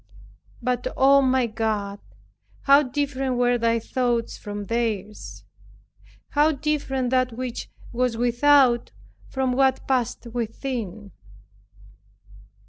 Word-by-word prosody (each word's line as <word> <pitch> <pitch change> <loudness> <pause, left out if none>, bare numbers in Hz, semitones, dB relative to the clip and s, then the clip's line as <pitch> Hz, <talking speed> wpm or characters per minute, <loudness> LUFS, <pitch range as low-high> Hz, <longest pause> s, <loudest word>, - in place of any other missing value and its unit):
But, 250 0 -1
O 275 +1 +6
my 260 -1 +2
God, 215 -3 -2 0.6
how 280 +1 +6
different 270 -2 -2
were 245 0 +2
Thy 230 0 +2
thoughts 240 0 -1
from 205 -1 -6
theirs, 215 -2 -3 0.8
how 300 +2 +3
different 270 -3 -1
that 255 -2 +1
which 250 0 -5 0.2
was 245 -1 0
without, 245 +1 +3 0.4
from 260 -1 -1
what 265 0 +1
passed 255 -3 -1
within! 225 -4 -4
245 Hz, 100 wpm, -24 LUFS, 230-265 Hz, 0.8 s, O